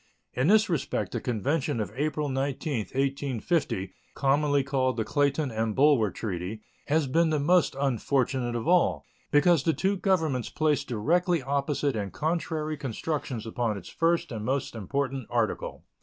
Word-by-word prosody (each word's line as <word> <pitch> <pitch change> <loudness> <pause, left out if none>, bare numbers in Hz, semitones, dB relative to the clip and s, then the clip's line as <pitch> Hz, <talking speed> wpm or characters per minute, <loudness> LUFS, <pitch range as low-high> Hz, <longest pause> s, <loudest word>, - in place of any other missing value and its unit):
In 125 +4 +1
this 215 +3 +5
respect 125 - -1
the - - -3
convention 135 +4 -1
of 105 - -3
April 150 +1 -1
19, 135 -2 -2
1850, 135 - -1 0.2
commonly 145 0 +2
called 130 -2 0
the 110 - +1
Clayton 145 0 +1
and 110 -1 -1
Bulwer 135 -6 +4
treaty, 95 +1 -5 0.2
has 155 +1 +2
been 160 +5 +2
the 155 -1 +1
most 175 +2 +3
unfortunate 130 -1 0
of 120 +5 -3
all, 180 0 +3 0.2
because 165 +1 +4
the 160 +3 +1
two 195 +4 0
Governments 160 - 0
place 150 -2 +1
directly 165 - +1
opposite 140 0 0
and 100 -3 -3
contradictory 155 -1 -2
constructions 135 -2 -3
upon 115 -2 -1
its - - -9
first 165 -2 +1
and 110 -3 -4
most 130 +3 -1
important 135 +3 -3
article. 115 -3 -2
140 Hz, 150 wpm, -27 LUFS, 120-155 Hz, 0.2 s, this